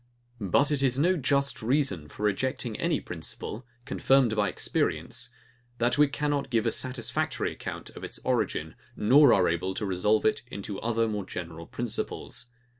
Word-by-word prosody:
But 120 - +2
it 145 -2 +1
is 130 -2 +2
no 175 +6 +3
just 140 -3 +1
reason 115 - +1
for 105 - -8
rejecting 115 +2 0
any - - +1
principle, 120 +4 -6 0.2
confirmed 135 -4 +3
by 105 -1 +2
experience, - - -1 0.5
that 120 +3 +1
we 150 - +7
cannot 145 -1 -1
give 115 -3 +1
a 115 - +2
satisfactory 125 -2 -1
account - - -7
of - - -11
its - - -4
origin, - - 0 0.2
nor 135 +5 +6
are 90 -2 +4
able 90 +3 -1
to 105 - -2
resolve 100 +3 +2
it 110 - +2
into 100 0 -5
other 115 0 +1
more 105 -3 -3
general 85 -2 -7
principles. 120 0 -3
120 Hz, 160 wpm, -28 LUFS, 100-135 Hz, 0.5 s, we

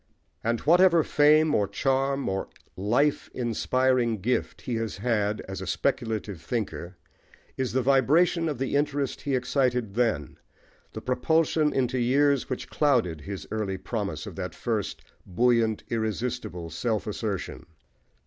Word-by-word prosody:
And 115 +1 0
whatever 170 0 +5
fame, 150 +1 +4
or 100 - +2
charm, 135 +6 0
or 95 0 -2 0.3
life 120 +10 +1
inspiring 125 -1 +1
gift 120 +7 -1
he 125 - -4
has 115 -2 -3
had 105 -1 0
as 95 -1 -7
a 95 - -6
speculative 110 - -2
thinker, 95 -3 -4 0.6
is 130 -2 -2
the 130 0 +1
vibration 155 +6 +3
of 145 - -3
the 135 +2 -2
interest 145 -2 0
he 140 -2 -1
excited 125 -4 0
then, 110 - -1 0.5
the - - -6
propulsion 155 +4 +2
into 130 -1 0
years 140 +3 +2
which 130 - -4
clouded 120 - +1
his 100 +4 -7
early 105 -3 -2
promise 95 -6 -4
of - - -8
that - - -5
first - - -3 0.2
buoyant, 115 +2 +2
irresistible, 110 -6 -3
self 110 +7 -1
assertion. 105 -2 -4
120 Hz, 135 wpm, -27 LUFS, 105-135 Hz, 0.6 s, whatever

